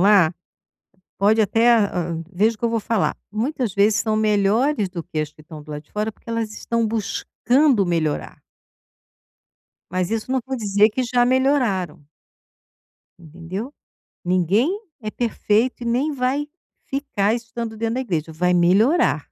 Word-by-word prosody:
lá 190 -4 +5 0.8
pode 210 +3 +4
até, 225 +3 +3
ah, 180 -7 +1 0.2
veja 215 +5 +2
o - - -41
que 235 - -4
eu - - +3
vou 230 -1 0
falar, 220 -1 0 0.2
muitas 240 0 -2
vezes 205 +1 +3
são 215 -1 0
melhores 215 +3 +2
do 180 -2 -6
que 155 - -6
as 155 -1 -2
que - - -19
estão 155 0 -11
do 150 - -13
lado 150 0 -6
de - - -33
fora, 210 +1 -1
porque 230 - -21
elas 230 -2 -2
estão 230 +1 -1
buscando 230 +2 +1
melhorar. 165 -3 -2 1.5
Mas 180 0 -1
isso 225 +2 -3
não 260 0 +1
vou 265 0 -3
dizer 210 -2 +3
que 230 +4 -2
já 245 0 +2
melhoraram. 250 - +1 1.2
Entendeu? 175 - -7 0.5
Ninguém 190 - +2 0.2
é 215 -2 -4
perfeito 235 +1 0
e - - -4
nem 255 +6 +1
vai 275 +2 -1 0.4
ficar 250 -7 0
estando 230 -1 -5
dentro 225 +1 -2
da 255 - -1
igreja. 165 - -3
Vai 180 +3 +1
melhorar. 205 - +3
215 Hz, 155 wpm, -22 LUFS, 185-240 Hz, 1.5 s, lá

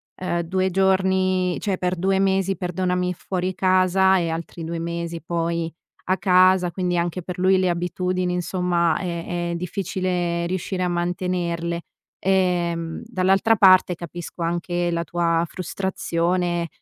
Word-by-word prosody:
ehm, 175 -2 -2
2 185 +2 0
giorni 185 -1 +2
cioè 195 -3 -1
per 180 0 -1
2 190 +2 +1
mesi, 195 0 +1
perdonami, 180 0 -1
fuori 185 +1 -3
casa 185 0 +3
e 170 - 0
altri 165 +1 -5
2 165 0 -4
mesi 170 0 -4
poi 170 -1 -2 0.4
a 190 - +3
casa, 185 -1 +4
quindi 180 0 -1
anche 175 +1 -1
per 180 +2 -7
lui 190 +1 +4
le 185 -1 +2
abitudini 180 +1 -1
insomma 175 -2 +1
è 175 -1 -3
è 170 - -2
difficile 180 -1 -2
riuscire 185 +1 -2
a 180 - +1
mantenerle. 175 -1 -2 0.4
Ehm, 175 -3 0
dall'altra 195 +1 +2
parte 185 -3 +6
capisco 170 +1 -8
anche 175 +1 -1
la 170 0 -1
tua 170 -1 +1
frustrazione, 175 -1 -1
180 Hz, 135 wpm, -23 LUFS, 170-185 Hz, 0.4 s, parte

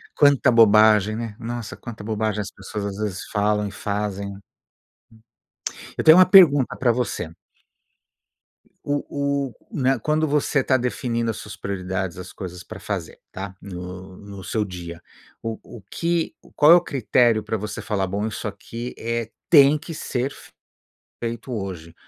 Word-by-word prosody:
Quanta 140 -2 +5
bobagem, 110 -2 +6
né, 115 -2 -5
nossa, 120 -1 -5
quanta 115 -3 -9
bobagem 110 -1 -1
as 100 - -6
pessoas, 100 +2 -6
às 100 -1 -4
vezes, 105 -3 -3
falam 105 0 +1
e - - -7
fazem. 100 -1 -3 1.6
Eu - - -1
tenho 160 +2 +9
uma 185 - +9
pergunta 150 -9 +7
para 125 -2 +3
você. 120 -8 -2 1.6
O 140 -1 -1
o, - - -17 0.2
né, 135 - +1
quando 155 +4 +1
você 145 -2 +1
tá 130 - +3
definindo 115 -1 -1
as 110 - -7
suas 105 - -8
prioridades, 95 -2 -3
as 90 0 -8
coisas 90 -2 -8
para 110 - -9
fazer, 95 -6 -5
tá, 95 0 -7
no 90 0 -8
no 100 -1 -10
seu 110 +2 -1
dia, 85 -3 -8 0.4
o 115 -1 -4
o 115 - -12
que 170 -1 -1 0.2
qual 150 +2 +7
é - - +11
o 175 - +5
critério 120 -6 +2
para 110 - -2
você 105 +1 -5
falar: 100 -3 -1
"Bom, 100 +4 -2
isso 110 - -4
aqui 115 +4 -7
é 115 0 -3 0.2
tem 145 -2 +7
que 165 - -9
ser 135 -3 -2
fe - - -14 0.7
feito 115 +2 -4
hoje?". 90 -6 -5
110 Hz, 160 wpm, -23 LUFS, 100-130 Hz, 1.6 s, é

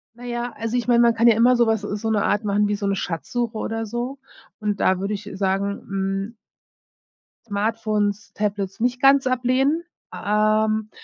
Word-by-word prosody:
Naja, 240 0 -4
also 230 +2 -2
ich 245 - -2
mein, 240 -1 +5
man 235 -1 +5
kann 230 +1 +3
ja 230 - +6
immer 245 +3 +5
so 235 -1 +3
was 220 -2 +1
so 210 +2 -3
'ne 215 -2 +1
Art 205 +2 +1
machen 205 0 +1
wie 205 - 0
so 200 -1 -3
'ne 195 - +1
Schatzsuche 225 +7 -3
oder 225 +1 -3
so 240 +5 -4 0.4
und 210 -2 -2
da 185 -1 +2
würde 200 +2 -2
ich, 205 - -6
äh, - - -7
sagen, 195 +1 -1
hm 195 +3 -3 1.1
Smartphones, 210 0 -1
Tablets 200 -1 -2
nicht 245 +2 0
ganz 275 -1 +5
ablehnen, 255 +5 +1 0.3
ähm, 215 +1 +1
215 Hz, 180 wpm, -22 LUFS, 205-240 Hz, 1.1 s, ja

